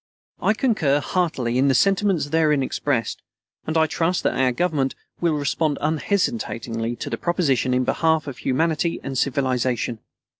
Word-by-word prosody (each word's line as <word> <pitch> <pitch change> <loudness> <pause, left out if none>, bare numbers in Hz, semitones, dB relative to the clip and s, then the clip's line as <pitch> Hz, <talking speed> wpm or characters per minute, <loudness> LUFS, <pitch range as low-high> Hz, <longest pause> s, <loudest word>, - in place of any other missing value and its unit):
I 215 - +3
concur 170 - +2
heartily 135 -9 -1
in 135 - +3
the 135 - +3
sentiments 195 - +2
therein 150 -3 +2
expressed, 130 -3 -2 0.5
and 160 +1 0
I 160 - +5
trust 165 +3 0
that - - +1
our 130 -1 +2
Government 140 -1 0 0.2
will 170 -3 +1
respond 145 +1 0
unhesitatingly 150 - -1
to - - -6
the - - -1
proposition 150 -8 +1
in 125 0 +2
behalf 160 +3 +1
of 140 -4 -7
humanity 160 +4 0
and 135 - -5
civilization. 130 -3 0
145 Hz, 150 wpm, -23 LUFS, 130-165 Hz, 0.5 s, I